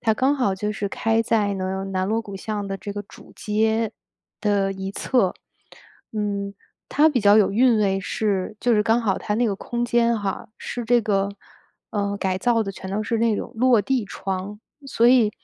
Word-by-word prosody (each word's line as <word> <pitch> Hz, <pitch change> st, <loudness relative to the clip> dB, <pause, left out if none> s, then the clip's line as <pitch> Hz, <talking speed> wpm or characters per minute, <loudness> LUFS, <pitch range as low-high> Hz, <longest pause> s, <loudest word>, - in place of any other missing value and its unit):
它 220 Hz, -2 st, +2 dB
刚 265 Hz, +5 st, +2 dB
好 250 Hz, -8 st, +1 dB
就 210 Hz, +2 st, -2 dB
是 205 Hz, -1 st, -3 dB
开 225 Hz, +3 st, +1 dB
在 210 Hz, -3 st, +1 dB
呢， 190 Hz, 0 st, -3 dB
南 185 Hz, 0 st, 0 dB
锣 225 Hz, +1 st, +1 dB
鼓 200 Hz, -2 st, -8 dB
巷 205 Hz, 0 st, -4 dB
的 195 Hz, 0 st, -3 dB
这 205 Hz, -, -6 dB
个 205 Hz, 0 st, -5 dB
主 -, -, -16 dB
街 220 Hz, +1 st, 0 dB, 0.5 s
的 200 Hz, -2 st, +1 dB
一 190 Hz, 0 st, -5 dB
侧， 220 Hz, -7 st, +1 dB, 0.8 s
嗯。 200 Hz, -2 st, -2 dB, 0.4 s
它 300 Hz, +2 st, +4 dB
比 255 Hz, -6 st, +1 dB
较 205 Hz, +1 st, +6 dB
有 200 Hz, -2 st, +4 dB
韵 240 Hz, +1 st, +4 dB
味 195 Hz, -2 st, +1 dB
是 205 Hz, 0 st, -2 dB
就 245 Hz, -, +2 dB
是 210 Hz, -, +3 dB
刚 225 Hz, +1 st, +3 dB
好 205 Hz, -5 st, 0 dB
它 210 Hz, -, -2 dB
那 240 Hz, +1 st, +2 dB
个 200 Hz, -, 0 dB
空 240 Hz, +2 st, -3 dB
间 235 Hz, -1 st, +2 dB
哈， 200 Hz, 0 st, -4 dB
是 240 Hz, -1 st, -5 dB
这 240 Hz, -1 st, +4 dB
个， 200 Hz, -2 st, +1 dB, 0.6 s
呃， 200 Hz, -1 st, -1 dB
改 185 Hz, -1 st, -1 dB
造 235 Hz, -1 st, +2 dB
的 195 Hz, -1 st, -5 dB
全 190 Hz, 0 st, -8 dB
都 210 Hz, +2 st, -1 dB
是 225 Hz, +1 st, -1 dB
那 225 Hz, -2 st, +2 dB
种 -, -, -5 dB
落 245 Hz, -3 st, +4 dB
地 255 Hz, -1 st, 0 dB
窗。 195 Hz, +2 st, -5 dB, 0.3 s
所 235 Hz, -3 st, +2 dB
以， 240 Hz, -4 st, +5 dB
210 Hz, 215 characters per minute, -23 LUFS, 195-230 Hz, 0.8 s, 较